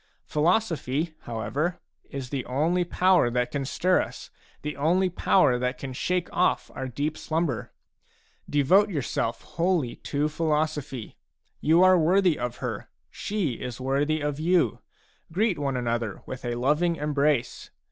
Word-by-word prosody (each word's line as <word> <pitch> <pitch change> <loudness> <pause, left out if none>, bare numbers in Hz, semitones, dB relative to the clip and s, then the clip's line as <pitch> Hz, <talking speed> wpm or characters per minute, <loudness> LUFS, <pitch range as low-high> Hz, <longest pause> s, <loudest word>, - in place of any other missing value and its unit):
Philosophy, 160 - 0
however, 145 +10 -2 0.3
is 135 -3 -6
the 135 -3 -2
only 160 +8 +1
power 180 -5 +3
that 125 0 -1
can 140 -1 -2
stir 180 +7 +2
us, - - -8 0.3
the 150 0 -3
only 180 +6 +2
power 145 -8 +3
that 125 +1 -1
can 135 0 -6
shake 180 +7 -1
off 180 - +1
our 130 - -4
deep 145 +5 -2
slumber. 155 -7 -2 0.8
Devote 180 +9 +4
your 150 -8 -2
self 115 0 -2
wholly 170 -7 0
to 145 +1 -1
philosophy. 150 - -2 0.4
You 165 +4 +4
are 185 -1 +6
worthy 180 +1 +3
of 125 -1 -3
her; - - -4 0.2
she 185 - -2
is 125 -1 -5
worthy 145 +4 0
of 145 0 -2
you; 165 - +2 0.5
greet 190 -1 +1
one 135 -2 -1
another 115 -4 -2
with 130 -1 -7
a 120 0 -1
loving 150 +8 +2
embrace. 145 -4 0
150 Hz, 145 wpm, -26 LUFS, 130-175 Hz, 0.8 s, are